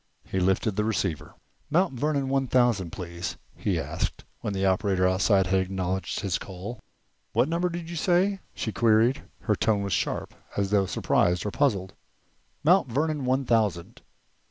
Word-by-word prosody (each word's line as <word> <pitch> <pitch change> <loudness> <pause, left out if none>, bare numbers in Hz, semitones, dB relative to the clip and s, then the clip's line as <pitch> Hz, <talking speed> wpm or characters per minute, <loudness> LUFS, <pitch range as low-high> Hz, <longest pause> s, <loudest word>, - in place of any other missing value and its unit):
He 95 - -2
lifted 95 +3 +1
the 105 - +2
receiver. 100 -7 -2 0.3
"Mount 175 +1 +2
Vernon 140 +1 0
one 135 0 +1
thousand, 120 -8 +2
please," 85 -1 -5 0.2
he - - -1
asked, - - -3
when 105 - -3
the 95 -1 -1
operator 95 -1 +2
outside 95 +1 +3
had 95 +1 +2
acknowledged 95 0 -2
his 95 -4 -1
call. 100 +5 -7 0.5
"What 130 - +3
number 170 +2 0
did 170 -1 -5
you 170 - -6
say?" 185 +4 +2 0.2
she 110 - -2
queried. 115 +3 +3 0.2
Her - - +1
tone 105 -2 +1
was 100 -2 -2
sharp, - - -1 0.2
as 100 -1 0
though 100 -2 +3
surprised 90 0 +1
or 105 - -1
puzzled. 100 -10 0 0.7
"Mount 175 -1 +5
Vernon 145 +3 -1
one 130 +1 +1
thousand." 105 -8 0
105 Hz, 160 wpm, -27 LUFS, 95-135 Hz, 0.7 s, Mount